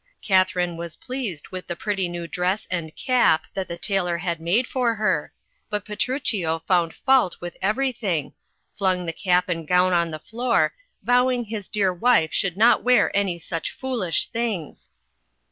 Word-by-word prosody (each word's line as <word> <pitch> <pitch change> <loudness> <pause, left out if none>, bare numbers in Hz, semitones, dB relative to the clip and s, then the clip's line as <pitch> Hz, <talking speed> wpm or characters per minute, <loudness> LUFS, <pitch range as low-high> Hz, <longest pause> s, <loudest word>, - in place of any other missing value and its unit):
Katharine 185 -3 +2
was 170 -1 -6
pleased 245 - -5
with 185 -1 -7
the 175 - -3
pretty 195 -2 -1
new 175 0 -5
dress 180 +4 -1
and 165 -4 -3
cap 240 -12 +3
that 190 -1 -3
the 170 - -5
tailor 180 -2 0
had 170 -1 -3
made 190 +10 +2
for 245 -3 0
her, 190 -8 0 0.4
but 210 -1 -3
Petruchio 210 - -1
found 175 -3 +2
fault 260 -9 +3
with 175 0 -7
every 255 +7 +1
thing, 185 - -2 0.4
flung 185 -2 0
the 165 - -3
cap 180 0 +1
and 165 -3 -3
gown 180 +1 +3
on 170 -1 +2
the 155 - -5
floor, 235 +8 0 0.3
vowing 250 0 +3
his 210 -2 -5
dear 195 -4 +2
wife 180 -4 +3
should 185 -2 0
not 230 +3 +5
wear 250 -4 +3
any 195 -4 +1
such 165 -1 -4
foolish 240 -10 -1
things. 225 -9 -4
185 Hz, 165 wpm, -23 LUFS, 170-225 Hz, 0.4 s, not